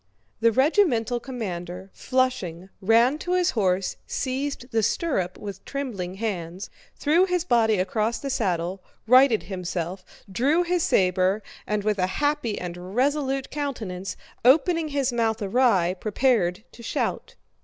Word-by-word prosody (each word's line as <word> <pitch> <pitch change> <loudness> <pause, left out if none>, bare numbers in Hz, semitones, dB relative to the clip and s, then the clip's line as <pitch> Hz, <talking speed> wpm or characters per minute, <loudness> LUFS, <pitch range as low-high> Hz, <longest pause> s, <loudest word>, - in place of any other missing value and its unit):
The 230 0 +4
regimental 255 - +2
commander, 190 -7 -6
flushing, 225 -9 -1
ran 230 +8 +4
to 355 - -2
his 365 0 +2
horse, 190 -4 0
seized 265 -1 -3
the 225 -1 +2
stirrup 205 - -1
with 200 -2 -8
trembling 215 -11 -4
hands, 190 -3 -4 0.2
threw 330 +5 +3
his 360 -2 0
body 225 - +3
across 215 +5 0
the 275 - -4
saddle, 185 -5 -1 0.2
righted 255 -1 +5
himself, 180 -1 -4 0.3
drew 285 - +2
his 355 0 0
saber, 185 - +2 0.2
and 210 -1 -1
with 210 -1 0
a 185 - +2
happy 290 -7 0
and 180 +2 -7
resolute 270 0 0
countenance, 220 -11 -4 0.3
opening 320 +6 +4
his 280 -4 -1
mouth 225 -2 +1
awry, 200 -4 +2
prepared 210 -1 +1
to - - -13
shout. - - -3
225 Hz, 135 wpm, -25 LUFS, 190-270 Hz, 0.3 s, righted